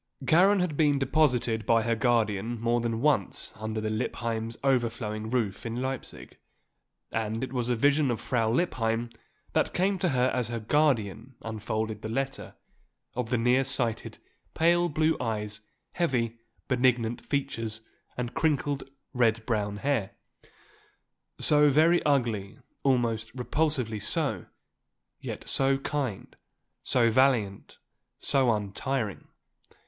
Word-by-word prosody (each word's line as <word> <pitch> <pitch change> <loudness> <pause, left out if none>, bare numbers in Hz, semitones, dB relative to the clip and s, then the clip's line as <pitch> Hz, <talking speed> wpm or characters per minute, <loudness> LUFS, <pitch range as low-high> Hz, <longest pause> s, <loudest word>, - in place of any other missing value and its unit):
Karen 190 +8 +5
had 175 -5 -1
been 145 -2 +3
deposited 130 -5 +2
by 115 -1 +4
her 115 +1 +1
guardian 115 -1 +1
more 120 +1 +1
than 115 -1 -2
once 140 - +1
under 110 +1 -3
the 110 0 -2
Lippheim's 115 0 -3
overflowing 115 -5 0
roof 110 -5 -1
in 115 +1 -4
Leipsig, 130 0 -5 0.7
and 110 +1 -2
it 130 - -5
was 125 -2 -1
a 120 - +2
vision 145 +4 +3
of 120 - -1
Frau 115 -3 0
Lippheim 115 -5 0 0.4
that - - +1
came 190 +1 +1
to 180 - +1
her 130 -2 +2
as 125 -3 0
her 115 0 -3
guardian 120 -2 0
unfolded 110 0 -3
the 110 - -5
letter 135 +3 -3 0.6
of 125 -2 -3
the 125 - +1
near 125 +3 +3
sighted, 120 -4 -1 0.4
pale 175 +2 +3
blue 155 +1 +2
eyes, 110 -2 -3 0.3
heavy, 120 -9 -1 0.3
benignant 120 -3 +1
features, 115 -6 -3 0.4
and 120 -1 -3
crinkled, 145 -3 0 0.2
red 115 -3 +2
brown 105 -3 -1
hair. 120 -5 -1 1.2
So 150 -1 +4
very 160 +5 +4
ugly, 115 -9 0 0.2
almost 115 -4 +1
repulsively 130 -4 -1
so; - - -2 0.7
yet - - -7
so 135 0 +2
kind, 135 -7 -4 0.5
so 115 -2 +2
valiant, 120 -6 +1 0.4
so 135 -3 +2
untiring. 105 +2 -2
120 Hz, 125 wpm, -28 LUFS, 110-135 Hz, 1.2 s, Karen